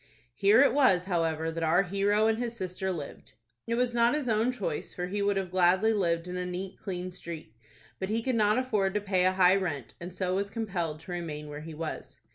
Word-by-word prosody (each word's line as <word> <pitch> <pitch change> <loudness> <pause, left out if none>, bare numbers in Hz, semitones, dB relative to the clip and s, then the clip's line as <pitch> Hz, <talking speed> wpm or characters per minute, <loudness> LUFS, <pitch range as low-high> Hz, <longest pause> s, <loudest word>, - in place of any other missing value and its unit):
Here 205 - +5
it 285 - +3
was, 255 -11 +4
however, 165 -3 0
that 165 0 -5
our 165 +4 +3
hero 200 +3 +1
and 225 0 +2
his 235 -1 -3
sister 190 -1 -3
lived. 155 -6 -7 0.3
It 230 - 0
was 245 0 +1
not 235 +2 +3
his 295 -4 -2
own 225 +2 +2
choice, 195 -11 -4
for 180 - -2
he 200 +3 -3
would 200 0 +1
have 190 -2 -3
gladly 185 +4 +4
lived 170 -4 0
in 180 0 -4
a 180 - -2
neat, 185 +1 -5
clean 185 -2 -5
street; 165 -9 -8 0.5
but 190 - -3
he 225 +1 0
could 260 - 0
not 215 -2 +3
afford 210 -7 0
to - - +3
pay 190 -3 +1
a 185 - +3
high 185 0 +5
rent, 155 -10 -3
and 175 +1 -6
so 185 0 -2
was 200 +1 -1
compelled 180 -8 -3
to 180 - -10
remain 155 -4 -5
where 145 0 -7
he 160 0 -8
was. 160 0 -6
190 Hz, 230 wpm, -29 LUFS, 175-215 Hz, 0.5 s, Here